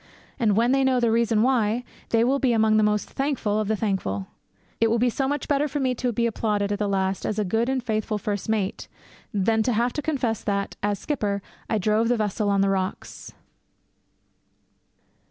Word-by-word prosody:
And 215 -5 +2
when 235 +2 +3
they 270 0 +3
know 260 -1 +3
the 235 -2 +2
reason 225 -1 +2
why, 240 -2 +1 0.3
they 230 0 +3
will 270 +3 +2
be 255 -3 +2
among 220 -1 +3
the - - +4
most 210 0 +1
thankful 265 -7 -1
of 215 - -1
the 220 - +1
thankful. 190 - -2 0.5
It 225 - +3
will 230 - +2
be 245 +1 +2
so 270 +3 -1
much 290 0 -2
better 290 0 +2
for 290 +1 -3
me 260 -2 +1
to 250 0 -1
be 235 +1 0
applauded 210 -3 0
at 205 - -1
the 210 - 0
last 190 -1 0
as 215 - -2
a 210 - 0
good 225 +6 0
and 265 -2 -1
faithful 215 -2 -1
first 205 0 -3
mate 210 -3 -1 0.4
than 220 +2 +1
to 245 +2 +1
have 235 +3 +1
to 295 - -2
confess 255 -8 -1
that, 200 -1 -2
as 205 0 0
skipper, 205 -9 -2 0.3
I 220 - +1
drove 215 +3 +2
the 245 0 +2
vessel 210 0 -1
on 200 -1 +2
the 195 - +3
rocks. 190 -1 -4
220 Hz, 210 wpm, -24 LUFS, 205-245 Hz, 0.5 s, the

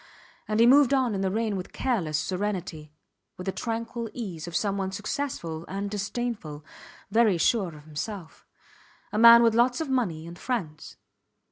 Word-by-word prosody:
And 215 0 0
he 230 - +7
moved 275 +2 +6
on 255 -4 +1
in 195 - -2
the 190 - +1
rain 220 +1 -1
with 185 -1 -6
careless 180 - -1
serenity, 180 -3 -3 0.5
with 180 - -7
the 190 - -1
tranquil 230 +1 -4
ease 180 -8 -6
of 170 - -7
someone 195 -2 -1
successful 200 - -4
and 200 +1 -4
disdainful, 205 -7 -4 0.5
very 220 -4 +4
sure 180 -1 +1
of 150 - -13
himself 160 +3 -7 0.6
a 210 - -1
man 235 +1 +9
with 230 -1 +4
lots 245 +2 +3
of 320 -3 -3
money 190 -12 -1
and 170 +1 -10
friends. 165 -12 -4
205 Hz, 160 wpm, -26 LUFS, 170-235 Hz, 0.6 s, man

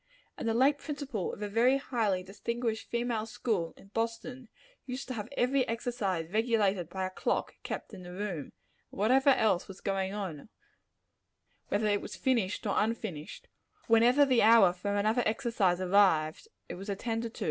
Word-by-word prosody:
And 230 - -3
the 225 - 0
late 275 +4 +4
principal 280 - -4
of 210 - -7
a - - -2
very 235 +6 +3
highly 220 -9 -1
distinguished 225 +4 -3
female 235 -2 -1
school 215 -7 -2
in 195 - -17
Boston, 230 +3 -4 0.4
used 255 +1 -5
to - - -2
have 220 -1 -5
every 260 +2 +3
exercise 225 -8 -2
regulated 210 -6 +1
by 190 +1 -3
a 185 - -4
clock - - -1
kept - - -6
in 190 - -9
the 180 0 -9
room; 180 -6 -4
and - - -20 0.4
whatever 260 +7 +3
else 220 -9 +3
was 195 0 -10
going 195 -1 -1
on 195 -5 -5 1.2
whether 215 - 0
it 205 -1 +2
was - - -7
finished 230 -8 0
or 200 - 0
unfinished 210 -8 -3 0.4
whenever 240 +5 +5
the 255 -4 +3
hour 220 -5 +7
for 200 +3 -3
another 215 +4 +2
exercise 215 -6 +1
arrived, 185 - +3 0.2
it - - -6
was 195 +3 -8
attended 225 +3 -3
to. - - -10
215 Hz, 170 wpm, -30 LUFS, 195-235 Hz, 1.2 s, hour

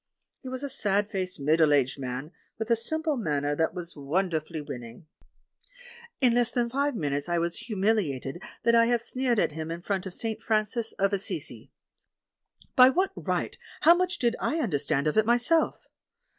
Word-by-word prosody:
He 260 - -7
was 260 +2 -5
a 280 - -3
sad 205 -1 0
faced, 185 -4 -3
middle 155 +2 +3
aged 140 0 0
man, 130 +4 -5 0.3
with 220 +1 -3
a - - +6
simple 310 +6 0
manner 145 -8 -1
that 160 +3 0
was 175 -1 -6
wonderfully 160 +2 -2
winning. 120 -1 -8 1.1
In 250 -3 +4
less 240 -1 +2
than 235 0 -1
five 280 +1 0
minutes 145 -4 -2
I 175 - +1
was 170 0 0
humiliated 190 - -1 0.2
that 235 - +3
I 230 0 +5
had 240 -1 +2
sneered 250 0 -1
at - - +2
him 160 +1 -5
in 170 +1 -6
front 195 -1 -2
of 180 - -9
"St. 225 -1 -3
Francis 220 +1 0
of 195 +1 0
Assisi." 200 0 -4 1.1
By 255 0 +8
what 370 +8 +1
right, - - -2 0.3
how 335 - +8
much 360 0 0
did 240 -3 +1
I 315 - -1
understand 145 - 0
of 150 - 0
it 220 - +5
myself? 245 +8 +3
200 Hz, 175 wpm, -27 LUFS, 155-240 Hz, 1.1 s, By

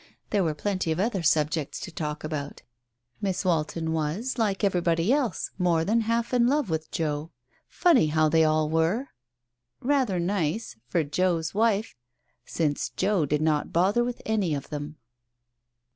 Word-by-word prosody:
There 205 -3 +2
were 155 -3 -1
plenty 185 -1 -1
of 160 - -1
other 200 -2 0
subjects 155 -1 +1
to 190 -3 -6
talk 150 -2 -4
about. 150 -2 -5 0.6
Miss 190 -1 -1
Walton 160 -1 0
was, 165 - -2
like 210 -2 0
everybody 175 +1 +2
else, 265 - -1
more 170 -3 +2
than 230 +4 +2
half 230 +2 -1
in 240 -1 +4
love 280 - +1
with 160 0 -2
Joe.... 150 -1 -2 0.4
Funny 345 - +3
how 155 +1 +3
they 160 +1 +4
all 155 0 +2
were! 165 - 0 0.7
Rather 255 -8 +1
nice; 175 - -1
— - - -47
for 165 +3 +1
Joe's 165 +1 0
wife, 220 0 +1 0.5
since 150 -3 -1
Joe 195 -8 0
did 150 +2 0
not 155 -2 +1
bother 195 +8 +3
with 245 0 -4
any 205 -8 0
of 140 - -6
them. 150 +1 -5
170 Hz, 160 wpm, -26 LUFS, 155-210 Hz, 0.7 s, in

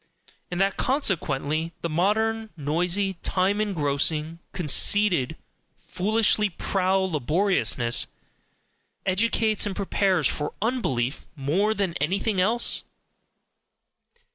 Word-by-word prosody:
And 175 - -4
that 195 0 +1
consequently 165 - -1
the - - 0
modern, 220 +7 0
noisy, 175 +5 -1
time 195 +3 +1
engrossing, 155 -3 0
conceited, 175 -2 +3 0.4
foolishly 210 +1 +1
proud 190 +1 0
laboriousness 150 -4 +1 1.0
educates 215 +2 +1
and 195 - -4
prepares 190 -4 +1
for 150 - -2
"unbelief" 150 - -1
more 175 +10 0
than 195 -4 -1
anything 195 +5 0
else? 225 +6 +2
185 Hz, 90 wpm, -25 LUFS, 155-205 Hz, 1.0 s, conceited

